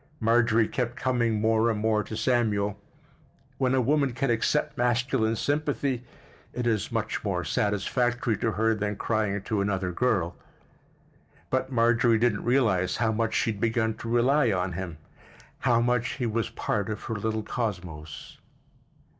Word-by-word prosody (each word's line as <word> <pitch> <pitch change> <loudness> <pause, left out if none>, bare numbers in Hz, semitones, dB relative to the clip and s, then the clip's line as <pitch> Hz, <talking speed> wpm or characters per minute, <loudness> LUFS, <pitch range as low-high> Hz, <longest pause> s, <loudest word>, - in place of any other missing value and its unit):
Marjorie 115 -1 +3
kept 120 -2 -2
coming 120 -4 0
more 110 +1 +3
and 110 -2 -1
more 110 0 +1
to 110 - -6
Samuel; 105 -5 0 0.8
when 130 -1 +2
a 130 - +3
woman 140 +1 +2
can 135 0 0
accept 120 +6 0
masculine 120 -1 +1
sympathy 145 -3 -1 0.5
at 125 - -1
is 110 -4 0
much 115 -1 -2
more 95 -4 -1
satisfactory 115 +6 0
to 115 - -1
her 110 +1 +2
than 105 -1 -2
crying 105 -2 -1
to 105 -3 -1
another 95 -2 -1
girl. 90 -5 0 1.2
But 130 0 0
Marjorie 115 -1 +3
didn't 115 -2 +1
realize 110 -8 +2
how 110 -2 +1
much 110 0 -1
she 115 - +2
had 105 -1 -8
begun 110 -1 +1
to 115 - -6
rely 120 +2 +3
on 90 -1 -1
him, 85 -2 -5 0.6
how 120 -3 +3
much 125 +1 +1
he 130 -2 -3
was 115 0 -1
part 105 0 -2
of 105 - -4
her 115 - -3
little 110 +1 -2
cosmos. 90 - -5
115 Hz, 155 wpm, -27 LUFS, 105-120 Hz, 1.2 s, Marjorie